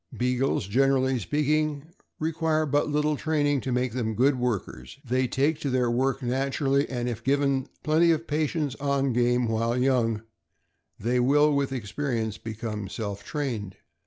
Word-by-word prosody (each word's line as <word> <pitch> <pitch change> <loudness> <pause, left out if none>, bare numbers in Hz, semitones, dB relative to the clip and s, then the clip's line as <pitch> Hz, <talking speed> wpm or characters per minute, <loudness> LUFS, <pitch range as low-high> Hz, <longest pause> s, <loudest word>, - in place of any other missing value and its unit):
Beagles, 125 -2 0
generally 130 +3 +2
speaking, 150 +3 0 0.3
require 160 0 0
but 145 +1 +1
little 150 +1 +1
training 145 -3 +1
to 130 - -3
make 125 0 0
them 110 -3 -2
good 130 +3 +3
workers. 105 - -3
They 130 +1 +1
take 145 +5 +1
to 140 - -2
their 125 -2 +1
work 135 +2 0
nat 135 +2 -1
urally, 140 0 +1
and 120 -2 -2
if 120 -1 -4
given 140 0 +1 0.2
plenty 160 +2 +4
of 165 0 +1
practice 150 -2 -1
on 140 -2 +1
game 120 0 +2
while 115 +2 0
young, 120 -4 +1 0.8
they 120 +4 +1
will, 145 +4 +4
with 140 -1 0
experience, 115 -2 -3
become 110 -2 -5
self 100 -3 -5
trained. 115 -10 -4
130 Hz, 155 wpm, -26 LUFS, 120-145 Hz, 0.8 s, plenty